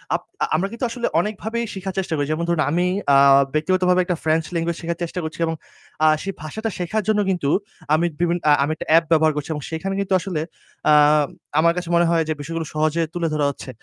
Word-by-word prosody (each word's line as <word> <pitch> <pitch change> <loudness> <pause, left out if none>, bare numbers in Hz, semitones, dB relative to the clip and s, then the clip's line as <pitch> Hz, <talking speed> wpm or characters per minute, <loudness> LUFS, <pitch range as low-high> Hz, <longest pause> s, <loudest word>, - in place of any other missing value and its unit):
Up - - -2 0.2
আ - - +4
আমরা 185 +5 0
কিন্তু 235 +2 -3
আসলে 240 0 -2
অনেকভাবেই 220 +4 -2
শিখার 190 -1 -5
চেষ্টা 185 -3 -3
করি। 145 - 0
যেমন 155 +2 -1
ধরুন 170 -2 +1
আমি 175 +2 +1 0.3
আ - - +7 0.4
ব্যক্তিগতভাবে 180 +3 +2
একটা 175 -2 -1
ফ্রেঞ্চ 160 +1 +2
ল্যাঙ্গুয়েজ 170 0 -1
শেখার 170 0 -3
চেষ্টা 170 +2 -4
করছি 160 +1 -6
এবং 165 0 -2 0.5
আ - - +6 0.2
সেই 195 - -4
ভাষাটা 220 +9 -4
শেখার 190 +4 -1
জন্য 215 -1 +2
কিন্তু 175 -7 0 0.4
আমি 160 +2 +3 0.2
বিভিন 175 0 +2
আ - - +7
আমি 145 - -1
একটা - - -8
অ্যাপ 165 +1 +6
ব্যবহার 160 -1 +4
করছি। 150 +1 -4
এবং 150 - -5
সেখানে 185 +4 -3
কিন্তু 195 -1 -1
আসলে 175 -4 -3 0.5
আ - - +7 0.7
আমার 170 +1 +4
কাছে 175 -1 -4
মনে 170 0 +4
হয় 165 -1 +2
যে - - +2
বিষয়গুলো 165 +2 -4
সহজে 155 +2 +1
তুলে 175 -2 -1
ধরা 150 -1 +1
হচ্ছে। 140 - -8
170 Hz, 215 wpm, -21 LUFS, 155-185 Hz, 0.7 s, আ